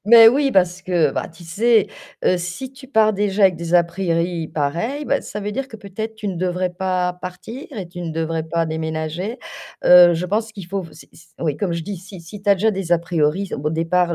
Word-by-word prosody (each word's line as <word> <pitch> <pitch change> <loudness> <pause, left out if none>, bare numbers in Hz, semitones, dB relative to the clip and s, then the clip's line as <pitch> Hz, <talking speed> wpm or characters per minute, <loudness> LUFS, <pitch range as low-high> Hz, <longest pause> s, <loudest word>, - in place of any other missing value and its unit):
mais 225 +1 +9
oui, 275 +4 +4
parce 180 -4 +2
que, 170 -6 +2
bah, - - -3
tu 165 +1 -15
sais, 215 +6 +3 0.4
heu, 180 - +4
si 180 +10 -5
tu 265 0 -14
pars 220 -4 +4
déjà 205 0 0
avec 190 -2 +6
des 170 +1 -3
a 175 - +6
priori 170 -2 -1
pareils, 170 - -2
bah, 280 - +1
ça 210 - -7
veut 210 0 -4
dire 270 +4 -3
que 220 - -9
peut-être, 215 +2 -6
tu 215 -1 -6
ne 190 - -2
devrais 180 +1 -1
pas 180 0 -1
partir 225 - -8
et 185 - -5
tu 175 +1 -9
ne 170 -2 -4
devrais 160 0 -2
pas 165 +1 -1
déménager. 160 - -3 0.5
Heu, 175 -1 +8
je 175 +3 -2
pense 220 +3 -1
qu'il 195 -5 -9
faut 195 +1 -3
f 165 - -10
c'est 155 - -16
s 165 0 -19
oui 155 -4 -1
comme 185 -2 -1
je 170 -1 -3
dis, 200 +1 -5
si 185 +1 -11
si 185 +5 -11
tu 200 - +2
as - - +7
déjà 220 +3 +2
des 190 -3 -4
a 175 - +5
priori 170 +3 0
au - - -5
b 150 - -5
au - - +2
départ, 170 +2 +1
180 Hz, 245 wpm, -21 LUFS, 170-210 Hz, 0.5 s, mais